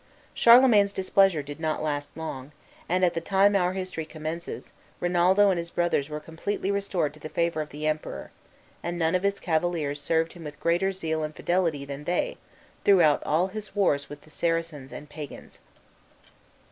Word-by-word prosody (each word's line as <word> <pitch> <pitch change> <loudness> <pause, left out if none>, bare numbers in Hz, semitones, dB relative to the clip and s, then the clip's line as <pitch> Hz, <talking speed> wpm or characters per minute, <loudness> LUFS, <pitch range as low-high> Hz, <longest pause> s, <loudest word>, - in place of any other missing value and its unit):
Charlemagne's 230 -4 +6
displeasure 190 -4 +3
did 145 +2 -8
not 155 -1 -1
last 145 -1 -2
long, 145 -3 -6 0.4
and, 180 +1 +3
at 175 - +1
the 165 - -2
time 195 +3 +3
our 180 -1 +2
history 185 -3 -4
commences, 155 +2 -6 0.3
Rinaldo 180 +3 +4
and 180 - 0
his 170 0 -5
brothers 170 -5 0
were 150 0 -4
completely 165 +6 -3
restored 195 -6 -1
to - - -15
the 155 - -7
favor 170 -1 0
of 150 - -6
the 150 +2 -6
Emperor, 155 0 -3 0.5
and 175 0 -3
none 165 0 +1
of 185 - +2
his 200 0 0
cavaliers 160 -3 -1
served 160 +2 0
him 175 - -11
with 145 -1 -8
greater 175 +3 +1
zeal 160 -4 -2
and 155 0 -4
fidelity 170 -6 0
than 140 +1 -7
they, 340 - -1 0.5
throughout 175 -7 +5
all 170 +5 +2
his 210 +1 -7
wars 145 -8 +1
with 145 0 -9
the 155 - -19
Saracens 165 -5 -2
and 150 - -9
Pagans. 150 -2 -10
170 Hz, 175 wpm, -26 LUFS, 155-185 Hz, 0.5 s, Charlemagne's